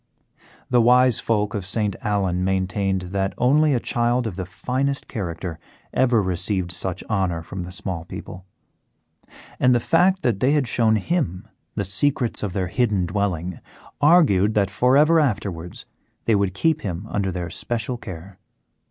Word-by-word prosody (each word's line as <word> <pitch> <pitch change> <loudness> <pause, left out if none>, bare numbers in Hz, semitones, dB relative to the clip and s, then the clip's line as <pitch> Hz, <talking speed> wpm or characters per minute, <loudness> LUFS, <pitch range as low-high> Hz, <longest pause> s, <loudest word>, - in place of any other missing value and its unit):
The 120 -1 +5
wise 125 0 +5
folk 105 -3 0
of 105 - -3
St. 100 +1 0
Allen 95 -4 0
maintained 95 0 0
that 95 0 -1
only 145 +3 +3
a - - +1
child 120 +1 0
of 105 -6 -4
the 95 -1 -5
finest 130 +8 -2
character 85 -4 -5 0.3
ever 120 -5 +3
received 90 0 -1
such 90 0 -4
honour 95 -6 -1
from 95 +3 -6
the 90 - -9
small 95 -3 -5
people, 90 +2 -9 1.1
and 125 -1 +4
that - - +3
the - - -12
fact 185 +3 +3
that 115 -6 +1
they 130 +6 +3
had 145 -4 +1
shown 115 -2 +2
him 105 - -2 0.3
the 100 - -1
secrets 120 +5 0
of 100 -4 -3
their 95 -1 -1
hidden 105 -5 +1
dwelling 90 -2 -2 0.4
augured 140 - +4
that 100 -2 +2
for 125 +6 +3
ever 160 +3 +5
afterwards 95 - -2 0.4
they 115 - +3
would 100 -2 +1
keep 155 +8 +1
him 95 -1 -4
under 100 -3 -1
their 90 -1 -4
especial 120 +7 -4
care. 95 -2 -9
100 Hz, 160 wpm, -22 LUFS, 95-125 Hz, 1.1 s, The